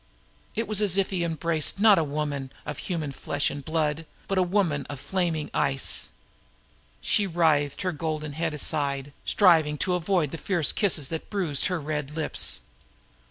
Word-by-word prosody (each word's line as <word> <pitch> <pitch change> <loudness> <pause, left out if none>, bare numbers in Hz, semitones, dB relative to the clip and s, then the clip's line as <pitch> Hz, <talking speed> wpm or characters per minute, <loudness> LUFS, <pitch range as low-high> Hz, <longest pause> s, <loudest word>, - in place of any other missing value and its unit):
It 225 +1 -1
was 215 -1 +1
as 195 -3 +2
if 195 0 +1
he 180 -3 0
embraced 165 +1 -1
not 210 -3 +7
a - - +2
woman 145 -2 -3
of 150 -1 -5
human 160 -6 -3
flesh 145 +1 -1
and 145 - -7
blood, 155 0 -1 0.2
but 195 -1 +1
a - - +5
woman 175 -7 +1
of 145 -2 -6
flaming 170 -2 -2
ice. 135 -1 0 0.9
She 205 -2 +2
writhed 160 -5 +1
her 185 - 0
golden 155 -2 -3
head 160 0 -2
aside, 140 -2 0
striving 160 -6 +4
to 180 +4 0
avoid 175 -4 +1
the 165 - -6
savage 170 -6 +1
kisses 165 -9 +1
that 160 -1 -5
bruised 180 -9 +1
her 180 -2 -1
red 150 -1 -4
lips. 155 - +1
160 Hz, 165 wpm, -26 LUFS, 145-180 Hz, 0.9 s, not